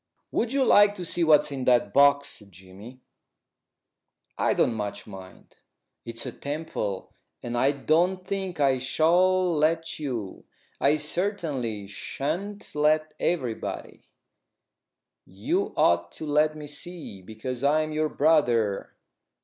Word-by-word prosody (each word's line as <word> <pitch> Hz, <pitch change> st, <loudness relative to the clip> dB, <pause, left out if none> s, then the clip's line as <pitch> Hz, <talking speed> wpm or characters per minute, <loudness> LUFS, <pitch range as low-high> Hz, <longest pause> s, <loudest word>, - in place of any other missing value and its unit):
"Would 230 Hz, -, 0 dB
you 270 Hz, -1 st, +2 dB
like 205 Hz, -2 st, +6 dB
to 180 Hz, -3 st, -6 dB
see 170 Hz, +1 st, 0 dB
what's 150 Hz, -2 st, +4 dB
in 135 Hz, -2 st, -4 dB
that 120 Hz, -5 st, +3 dB
box, 140 Hz, 0 st, +4 dB
Jimmy?" 95 Hz, +7 st, -14 dB, 1.3 s
"I -, -, +1 dB
don't 120 Hz, -, +2 dB
much 105 Hz, -2 st, -5 dB
mind." 95 Hz, -2 st, -13 dB, 0.5 s
"It's 115 Hz, 0 st, -5 dB
a -, -, -4 dB
temple, 140 Hz, -10 st, -5 dB, 0.3 s
and 120 Hz, 0 st, -4 dB
I 130 Hz, +3 st, +3 dB
don't 175 Hz, +6 st, +1 dB
think 190 Hz, -4 st, -4 dB
I 135 Hz, -2 st, +3 dB
shall 175 Hz, +6 st, +2 dB
let 160 Hz, +2 st, 0 dB
you. 120 Hz, -10 st, -5 dB, 0.4 s
I 145 Hz, +2 st, +3 dB
certainly 150 Hz, -, -2 dB
shan't 165 Hz, -, -5 dB
let 155 Hz, +1 st, +2 dB
everybody." 130 Hz, -10 st, -3 dB, 1.2 s
"You 95 Hz, +3 st, -2 dB
ought 85 Hz, 0 st, +3 dB
to 155 Hz, -, -7 dB
let 150 Hz, +1 st, +2 dB
me 150 Hz, -, -7 dB
see, 150 Hz, -, -8 dB
because 115 Hz, +6 st, -6 dB
I'm 155 Hz, +2 st, +2 dB
your 155 Hz, 0 st, 0 dB
brother." 120 Hz, -11 st, +1 dB
145 Hz, 125 wpm, -26 LUFS, 115-165 Hz, 1.3 s, like